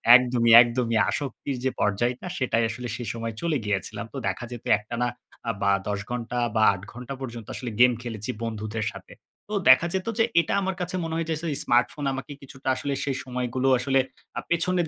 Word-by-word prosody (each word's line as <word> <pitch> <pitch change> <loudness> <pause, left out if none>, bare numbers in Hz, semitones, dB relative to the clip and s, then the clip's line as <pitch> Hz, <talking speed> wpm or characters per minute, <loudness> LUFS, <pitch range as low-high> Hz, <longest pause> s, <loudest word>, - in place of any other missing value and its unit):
একদমই, 120 -2 +4
একদমই, 120 -1 +1
আসক্তির 140 -1 -3
যে 130 - +2
পর্যায়টা 120 - 0
সেটাই 120 -3 +1
আসলে 120 +2 -5
সেই 120 -1 -6
সময় 115 -1 -4
চলে 165 -3 +1
গিয়েছিলাম। 105 +1 -2
তো - - -5
দেখা 95 +5 -2
যেত 120 - -8
একটানা 120 +3 -2 0.4
আ - - +3
বা 100 - +4 0.2
১০ 100 -1 -1
ঘণ্টা 120 0 -3 0.2
বা 110 - +3
৮ 95 - -7
ঘন্টা 125 +2 -7
পর্যন্ত 115 -4 -6
আসলে 120 -3 -5
গেম 125 0 +7
খেলেছি 110 -1 -6
বন্ধুদের 110 -1 -3
সাথে। - - -12 0.4
তো - - -5 0.2
দেখা 130 +6 +7
যেত 190 +2 -2
যে, 225 - +5 0.2
এটা - - -3
আমার 190 0 -1
কাছে 180 +1 -3
মনে 165 0 -3
হয় 165 0 -1
যে, 160 - +1 0.2
ইস 140 - -3
স্মার্টফোন 120 +4 +2
আমাকে 135 +3 -6
কিছুটা 135 -1 -11
আসলে 140 +2 -2
সেই 135 -2 -1
সময়গুলো 125 +1 -2
আসলে 135 +1 +2 0.4
আ - - +1
পেছনের 175 0 +1
125 Hz, 195 wpm, -26 LUFS, 115-135 Hz, 0.4 s, গেম